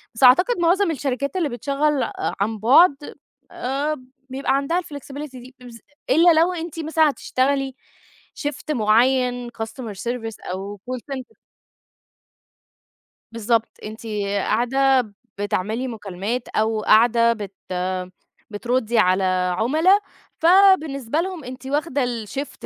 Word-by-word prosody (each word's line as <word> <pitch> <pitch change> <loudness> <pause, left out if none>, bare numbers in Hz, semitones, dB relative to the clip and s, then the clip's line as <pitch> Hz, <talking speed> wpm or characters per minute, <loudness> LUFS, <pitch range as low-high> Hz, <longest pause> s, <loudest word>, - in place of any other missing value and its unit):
بس 245 - -2
أعتقد 360 - +6
معظم 350 +1 +3
الشركات 280 +1 -3
اللي 330 -6 0
بتشغّل 280 +4 0
ع - - -3 0.3
عن 220 +2 0
بُعد، 280 - +4 0.4
آآ 285 +4 -2 0.3
بيبقى 270 +1 -1
عندها 330 +6 0
الflexibility 285 -2 -8
دي، 255 +1 -12
إبز 235 -2 -12 0.3
إلا 330 +5 +6
لو 360 +2 +2
أنتِ 330 -1 -6
مثلًا 315 -1 +2
هتشتغلي 270 0 -1 0.6
شيفت 290 +1 -5
معيّن 245 +1 +2
customer 225 -1 -6
service 230 -2 -4 0.2
أو 200 +1 -7
call 255 - -3 0.2
center 260 -1 -10 2.0
بالضبط، 230 0 0 0.2
أنتِ 220 +2 -9 0.2
قاعدة 245 +4 +1 0.3
بتعملي 210 +5 -2
مكالمات 215 +2 -4
أو 220 0 0
قاعدة 230 +2 +4
بت 205 -3 -8 1.0
بتردّي 235 +2 -1
على 185 -1 +3 0.3
عملا، 320 - +3 0.4
فبالنسبة 320 - +4
لهم 365 -5 -5
أنتِ 255 +1 -9
واخدة 290 -1 0
الشيفت 245 +3 -5
255 Hz, 115 wpm, -22 LUFS, 225-295 Hz, 2.0 s, أعتقد